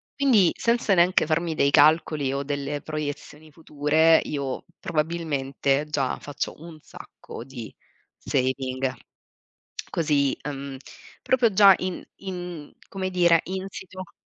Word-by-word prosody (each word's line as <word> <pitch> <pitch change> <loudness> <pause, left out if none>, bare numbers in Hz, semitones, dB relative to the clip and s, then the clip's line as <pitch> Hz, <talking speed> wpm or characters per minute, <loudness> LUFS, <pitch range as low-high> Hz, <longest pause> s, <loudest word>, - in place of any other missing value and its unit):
Quindi 240 - +4
senza 235 -3 +1
neanche 180 +1 +4
farmi 160 +1 -1
dei 140 -2 +2
calcoli 150 -2 +4
o 140 +1 -2
delle 145 +1 -3
proiezioni 155 0 -6
future, 160 +1 +3
io 140 -3 -4 0.2
probabilmente 150 -4 -1
già 135 -4 -1
faccio 145 -1 -5
un 165 -2 -11
sacco 120 - -11
di 125 -4 -9 0.4
saving. 130 0 -1 1.0
Così, 145 -4 +1
uhm, 140 -1 -6 0.4
proprio 245 -4 +2
già 200 -1 +8
in 185 -1 -4
in, 180 -5 -7 0.2
come 190 -1 -3
dire 175 -2 +4
insito. 190 -1 -7
155 Hz, 115 wpm, -25 LUFS, 140-180 Hz, 1.0 s, già